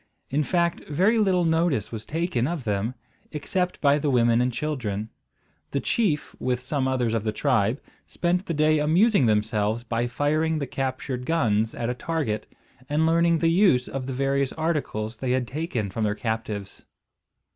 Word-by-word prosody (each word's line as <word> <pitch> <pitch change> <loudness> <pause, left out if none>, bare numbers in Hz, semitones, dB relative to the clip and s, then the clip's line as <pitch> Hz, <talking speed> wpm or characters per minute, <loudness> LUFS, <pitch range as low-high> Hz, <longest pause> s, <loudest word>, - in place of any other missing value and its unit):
In 145 +3 +2
fact 170 +2 0
very 190 +10 +3
little 185 -4 +3
notice 160 - +1
was 110 -1 -7
taken 155 -6 0
of 165 -4 -3
them, 105 +3 -1 0.4
except 180 +4 -2
by 145 0 +4
the 145 - 0
women 120 -2 +3
and 125 +1 +1
children. 115 -7 -3 0.6
The 140 - -1
chief 170 -3 0
with 125 -1 0
some 130 +1 -1
others 125 -4 0
of 115 -2 0
the 110 - 0
tribe 120 -1 +1 0.3
spent 180 +2 -1
the 170 - -1
day 155 +1 +3
amusing 165 - +4
themselves 105 +1 +1
by 120 0 -1
firing 155 +5 0
the 145 - -2
captured 130 -1 -3
guns 115 -9 +1
at 115 - -2
a 125 - 0
target, 125 -7 -3 0.4
and 150 +2 +2
learning 170 +1 +3
the 165 +1 +2
use 170 -9 +4
of 135 -1 -5
the 135 - -3
various 135 +1 0
articles 140 -9 -2
they 125 +1 -1
had 130 -2 0
taken 130 - -3
from 110 - -2
their 105 -1 0
captives. 110 -3 -4
135 Hz, 170 wpm, -25 LUFS, 115-160 Hz, 0.6 s, by